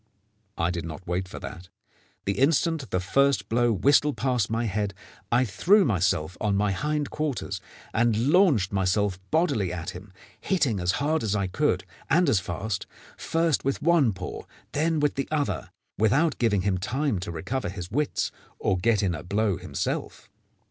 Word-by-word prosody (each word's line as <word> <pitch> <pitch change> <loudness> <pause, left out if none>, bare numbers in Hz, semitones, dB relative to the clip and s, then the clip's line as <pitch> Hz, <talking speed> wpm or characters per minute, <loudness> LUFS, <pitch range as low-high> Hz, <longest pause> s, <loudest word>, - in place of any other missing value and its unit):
I 85 +1 +1
did 85 -1 -3
not 85 +3 -7
wait 90 +2 -2
for - - -9
that. 90 -4 -8 0.6
The 100 0 -1
instant 155 0 +2
the 90 - 0
first 140 +10 +2
blow 120 +1 +3
whistled 140 +8 +3
past 125 -6 +1
my 115 +1 0
head 100 -1 -2 0.4
I 125 +2 +4
threw 195 - +4
myself 90 - +1
on 105 -2 +1
my 100 0 +2
hind 150 +7 -1
quarters 135 -11 -3 0.3
and 115 +2 +2
launched 155 - +4
myself 95 0 +1
bodily 110 - +1
at 85 -2 -4
him, 95 +2 -11 0.3
hitting 140 - +1
as 90 +1 +1
hard 155 +3 0
as 105 -2 0
I 100 -2 +1
could 90 - 0 0.3
and 170 +4 +4
as 110 - +4
fast, 100 +2 -4 0.3
first 165 -3 0
with 135 0 0
one 165 -7 +4
paw 95 -2 -6
and - - -12 0.3
then 160 +2 +1
with 145 -1 +2
the 135 - -3
other, 150 -2 -1 0.3
without 135 +10 +2
giving 105 -5 +2
him 95 -2 +1
time 130 +2 -1
to 90 - -5
recover 105 +8 -3
his 90 -2 -7
wits 145 +5 0 0.3
or 95 - 0
get 110 +1 +2
in 95 -3 +1
a 80 - -5
blow 100 +1 0
himself. - - -4
110 Hz, 175 wpm, -26 LUFS, 95-140 Hz, 0.6 s, I